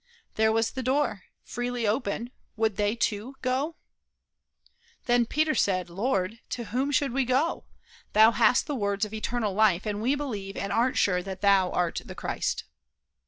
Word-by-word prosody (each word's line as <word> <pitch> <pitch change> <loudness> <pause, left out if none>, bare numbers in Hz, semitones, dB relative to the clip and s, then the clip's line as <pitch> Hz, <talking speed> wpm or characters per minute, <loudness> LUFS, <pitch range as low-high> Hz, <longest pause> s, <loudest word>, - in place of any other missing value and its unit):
There 220 0 +3
was 225 0 +1
the 260 - -4
door, 255 -6 0 0.2
freely 245 -1 -3
open, 230 +1 -1 0.2
would 220 -2 +1
they, 205 +2 +1
too, 230 +3 -2
go? 265 +6 0 1.3
Then 240 -1 +3
said - - -26
Peter: 200 - +1
"Lord, 200 0 -1
to 240 - -3
whom 255 +6 -1
should 285 -2 +1
we 270 +1 +2
go? 260 +6 0 0.5
Thou 220 +2 +7
hast 235 +1 +3
the 295 - -3
words 200 -4 0
of 210 - -10
eternal 220 -1 -2
life, 205 -2 +3
and 210 -1 -2
we 255 +5 +2
believe 210 -9 -5
and 200 - -2
are 245 +3 +2
sure 180 -2 +2
that 190 0 -7
thou 195 -2 +4
art 175 -2 -1
the - - -10
Christ." - - -2
225 Hz, 165 wpm, -27 LUFS, 200-255 Hz, 1.3 s, Thou